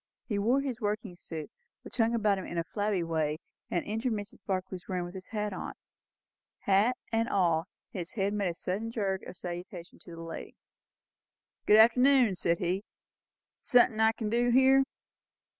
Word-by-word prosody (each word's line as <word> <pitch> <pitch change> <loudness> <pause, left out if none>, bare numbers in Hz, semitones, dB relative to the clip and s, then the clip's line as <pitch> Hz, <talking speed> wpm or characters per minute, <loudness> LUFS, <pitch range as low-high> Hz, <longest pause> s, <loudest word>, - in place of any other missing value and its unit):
He 210 -5 -1
wore 245 +7 +3
his 265 -5 -4
working 210 -2 -2
suit, 165 +2 -7 0.3
which - - -10
hung 230 0 +3
about 210 -3 +2
him 185 - -6
in 170 - -5
a 170 - +1
flabby 205 0 -1
way, 160 -2 -1 0.3
and 175 - -1
entered 225 +3 -1
Mrs. 205 -1 -7
Barclay's 185 -1 -4
room 180 -2 -1
with 175 - -9
his 185 -1 -9
hat 210 -2 -3
on. - - -5 0.9
Hat 205 +6 +3
and 225 0 +1
all, 170 -3 +2 0.2
his 180 -3 -6
head 200 -2 0
made 205 -2 0
a - - -10
little 205 +5 -1
jerk 195 -4 -1
of 180 - -10
salutation 175 0 -7
to 170 - -11
the 165 - -9
lady. 165 0 -7 1.1
"Good 210 - +7
arternoon!" 250 0 +6
said 170 -2 0
he. 180 +3 -1 0.8
"Sun'thin' 245 -3 +4
I 220 0 +5
kin 220 -2 -3
do 240 +1 +2
here?" 265 +2 +5
205 Hz, 175 wpm, -30 LUFS, 180-225 Hz, 1.1 s, Good